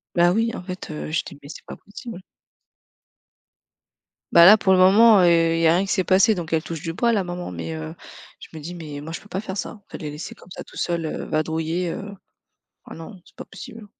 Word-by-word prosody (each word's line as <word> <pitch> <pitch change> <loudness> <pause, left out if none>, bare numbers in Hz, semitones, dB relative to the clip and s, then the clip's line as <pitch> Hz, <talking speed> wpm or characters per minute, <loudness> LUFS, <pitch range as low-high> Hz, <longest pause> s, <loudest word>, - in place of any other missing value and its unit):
Ben 175 0 +4
oui 225 +3 +1
en - - -6
fait, 185 -2 -7
heu, 150 - -6
je 160 - 0
dis: 145 - -11
«Mais 140 - -13
c'est 145 - -11
pas - - -9
possible.» 205 -1 -10 2.1
Bah 170 0 +8
là, 210 +4 +9
pour 190 - +1
le 185 - +5
moment, 205 +3 +7
heu, 180 - +5 0.3
il - - 0
y 165 - +4
a 160 - +5
rien 180 - +2
qui 195 - -4
s'est 185 -2 +1
passé 195 +4 +4
donc 170 -3 -5
elle 160 -1 +1
touche 165 -2 -6
du 165 0 -4
bois 235 +7 +1
la 205 -5 0
maman. 175 - -6
Mais 85 -2 -5
heu, 80 0 -6 0.5
je - - -11
me 155 - -8
dis: 170 +4 -7
«Mais 150 -4 -8
moi 155 +2 -8
je 165 - -5
peux - - -18
pas 190 -1 -4
faire 195 -2 -6
ça». - - -4
En 210 -3 -17
fait - - -7
les 150 - -6
laisser 150 +2 -8
comme - - -18
ça - - -8
tous - - -15
seuls, 170 -2 -2
heu, 155 - -4
vadrouiller, 160 +3 -1
heu, 200 +4 -6 0.7
ah - - -9
non! 165 +5 -10
C'est - - -23
pas - - -8
possible. 210 +3 -11
175 Hz, 255 wpm, -23 LUFS, 160-195 Hz, 2.1 s, là